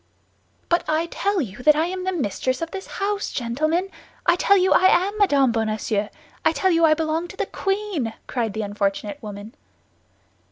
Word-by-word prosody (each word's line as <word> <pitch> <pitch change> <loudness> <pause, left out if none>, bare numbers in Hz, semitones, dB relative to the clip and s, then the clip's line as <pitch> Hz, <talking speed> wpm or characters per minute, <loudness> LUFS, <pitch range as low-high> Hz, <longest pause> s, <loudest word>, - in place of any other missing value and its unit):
"But 345 - +2
I 315 +2 +1
tell 395 +2 -1
you 210 -6 -6
that 300 +3 +5
I 315 +2 +2
am 365 +1 -4
the 375 - 0
mistress 255 - -1
of 330 0 -4
the 390 - -5
house, 405 +1 -2
gentlemen! 310 +10 -1 0.3
I - - +5
tell 400 +2 +4
you 375 0 +4
I 370 - +4
am 380 +3 +3
Madame 280 - +4
Bonacieux; 215 -2 -1 0.3
I - - +4
tell 375 - +1
you 335 -1 +3
I 310 -1 +5
belong 320 +2 -1
to 380 - -12
the 410 - 0
queen!" 390 - -2
cried 230 -5 -2
the 220 +1 -3
unfortunate 200 0 -2
woman. 210 +1 -8
315 Hz, 185 wpm, -23 LUFS, 225-375 Hz, 0.3 s, that